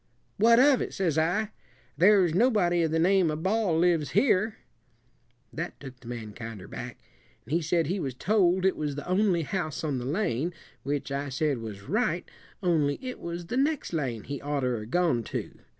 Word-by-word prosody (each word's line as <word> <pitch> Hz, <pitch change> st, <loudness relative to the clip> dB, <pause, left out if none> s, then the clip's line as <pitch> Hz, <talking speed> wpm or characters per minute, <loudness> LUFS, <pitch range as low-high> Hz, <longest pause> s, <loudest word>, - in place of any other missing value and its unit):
'What 230 Hz, +3 st, +6 dB
of 270 Hz, -1 st, +5 dB
it?' -, -, -4 dB
says 175 Hz, -6 st, 0 dB
I; 205 Hz, +7 st, 0 dB, 0.4 s
'there's 185 Hz, +1 st, +5 dB
nobody 185 Hz, -5 st, +3 dB
of 165 Hz, -, +1 dB
the 160 Hz, -, 0 dB
name 180 Hz, +1 st, +3 dB
of 155 Hz, +1 st, -3 dB
Ball 195 Hz, -4 st, +1 dB
lives 165 Hz, -6 st, +2 dB
here.' 215 Hz, -4 st, +3 dB, 1.0 s
That 170 Hz, +3 st, -5 dB
took 130 Hz, -2 st, -10 dB
the 125 Hz, -, -14 dB
man 115 Hz, -3 st, -6 dB
kinder 110 Hz, -4 st, -8 dB
back, -, -, -7 dB, 0.5 s
and 145 Hz, -, -6 dB
he 170 Hz, -, +2 dB
said 165 Hz, +1 st, +1 dB
he 185 Hz, +6 st, -1 dB
was 135 Hz, -7 st, -3 dB
told 190 Hz, +2 st, +2 dB
it 190 Hz, -, +3 dB
was 150 Hz, -2 st, -3 dB
the 145 Hz, -, -7 dB
only 185 Hz, -2 st, +2 dB
house 155 Hz, -2 st, -3 dB
on 145 Hz, -5 st, -1 dB
the 120 Hz, -, -5 dB
lane, 160 Hz, -, -1 dB, 0.3 s
which 145 Hz, 0 st, -3 dB
I 140 Hz, +1 st, -2 dB
said 140 Hz, -1 st, 0 dB
was 105 Hz, -3 st, -7 dB
right, 180 Hz, -, -1 dB, 0.4 s
only 155 Hz, -5 st, +2 dB
it 255 Hz, -1 st, -6 dB
was 170 Hz, 0 st, -5 dB
the 240 Hz, +9 st, -3 dB
next 285 Hz, -, 0 dB
lane 125 Hz, -9 st, -2 dB
he 140 Hz, +1 st, -6 dB
oughter 140 Hz, -4 st, -1 dB
'a' 105 Hz, 0 st, -7 dB
gone 160 Hz, -3 st, +1 dB
to. -, -, -5 dB
165 Hz, 190 wpm, -28 LUFS, 140-190 Hz, 1.0 s, What